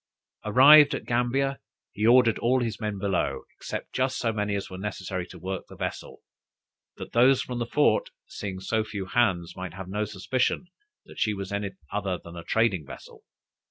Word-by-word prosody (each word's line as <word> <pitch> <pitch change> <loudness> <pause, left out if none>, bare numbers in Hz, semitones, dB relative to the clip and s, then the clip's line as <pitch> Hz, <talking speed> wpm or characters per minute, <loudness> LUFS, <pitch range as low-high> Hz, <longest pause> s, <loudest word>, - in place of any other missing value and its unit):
Arrived 145 +7 +8
at - - -6
Gambia, 130 +3 0 0.3
he 105 +2 0
ordered 120 -2 +5
all 125 +2 +2
his 110 -3 -3
men 105 -2 -3
below, 95 -2 -1
except - - -6
just 130 0 0
so 115 -2 0
many 105 -1 -1
as 100 - -3
were 95 - -8
necessary 95 -2 -4
to 90 - -12
work 95 +2 -5
the - - -11
vessel, - - -6 0.8
that - - -8
those 125 +3 +4
from 125 -1 -5
the 120 - -2
fort, - - +2 0.2
seeing 95 -2 -6
so 110 +4 0
few 105 -3 -5
hands, 95 -6 +1
might 95 -2 -7
have 95 -1 -7
no 105 +3 -2
suspicion 105 - -1 0.4
that - - -12
she 105 -1 +1
was 100 0 -6
any 100 -1 -3 0.2
other 95 -3 -2
than 85 0 -12
a 85 - -7
trading 110 -7 +1
vessel. 70 - -12
105 Hz, 185 wpm, -26 LUFS, 95-120 Hz, 0.8 s, Arrived